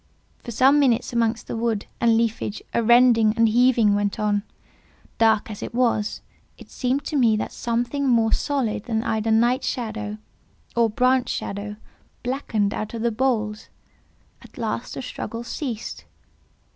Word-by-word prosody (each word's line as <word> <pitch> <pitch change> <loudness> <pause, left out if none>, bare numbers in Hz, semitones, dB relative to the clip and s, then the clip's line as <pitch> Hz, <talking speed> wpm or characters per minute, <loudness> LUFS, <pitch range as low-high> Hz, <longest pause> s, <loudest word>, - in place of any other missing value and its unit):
For - - -10
some 265 +5 +4
minutes 250 -3 +2
amongst 230 -1 0
the - - -5
wood 225 -2 -1
and 230 -1 +4
leafage 225 -2 -2
a - - +2
rending 230 -2 +5
and 230 0 +5
heaving 235 -2 +4
went 205 -1 -1
on. 205 -1 +1 0.8
Dark 220 -1 +3
as 205 - -8
it - - -6
was, 235 -4 0 0.4
it - - -15
seemed 260 +2 -1
to 305 - -4
me 230 -6 +4
that - - -3
something 240 +4 -2
more 230 -3 +3
solid 255 -8 -1
than 225 -1 -1
either 220 -1 -1
night 240 +4 +3
shadow, 215 -4 -3 0.6
or 235 -1 +3
branch 250 +3 +2
shadow, 205 +1 -4 0.5
blackened 230 -5 -1
out 215 +2 -4
of 225 - -4
the 235 - +2
boles. 215 -3 -1 0.7
At - - -17
last - - -3
the - - -5
struggle 240 - -6
ceased. 240 -3 -5
230 Hz, 155 wpm, -23 LUFS, 215-250 Hz, 0.8 s, rending